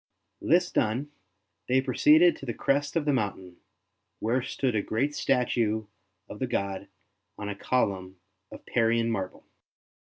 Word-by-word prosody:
This 175 +2 +3
done, 125 +7 0 0.6
they 130 +1 +3
proceeded 150 +6 +5
to - - -9
the 120 - -3
crest 145 +2 0
of 165 -3 +1
the 145 - +2
mountain, 95 -6 -3 0.6
where 120 +4 0
stood 130 0 -1
a 105 - +1
great 130 +9 -1
statue 115 -5 +1 0.4
of 105 - -9
the 130 - -1
god 100 -4 -2 0.5
on 105 -1 -5
a 105 - -4
column 95 -5 -1 0.3
of - - -11
Parian 115 0 +1
marble. 95 -4 -4
120 Hz, 145 wpm, -27 LUFS, 105-135 Hz, 0.6 s, proceeded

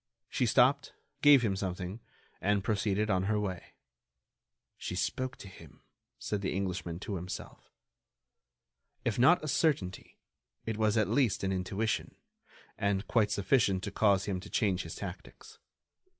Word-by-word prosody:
She 125 - 0
stopped, 135 +4 +3 0.3
gave 145 -4 +7
him 100 -4 +1
something, 95 +1 -4 0.4
and 100 0 +1
proceeded 105 0 0
on 95 0 +1
her 105 +1 +1
way. 95 -4 -5 1.0
"She - - -5
spoke 130 0 -2
to - - -10
him," 80 -6 -15 0.3
said 105 -2 -3
the 95 - -2
Englishman 90 -3 -3
to 100 -2 -3
himself. 90 +2 -8 1.4
If 120 -1 0
not 160 +8 +5
a - - -3
certainty, 140 - 0 0.5
it 110 - -2
was 110 0 +2
at 110 - +3
least 125 -10 +1
an 95 - 0
intuition, 95 +4 -2 0.6
and 100 0 0
quite 110 -3 +2
sufficient 100 -3 +2
to 100 - -4
cause 100 -2 +3
him 95 -3 -2
to 90 - -10
change 100 -7 +1
his 85 - -7
tactics. - - -9
100 Hz, 145 wpm, -31 LUFS, 95-115 Hz, 1.4 s, gave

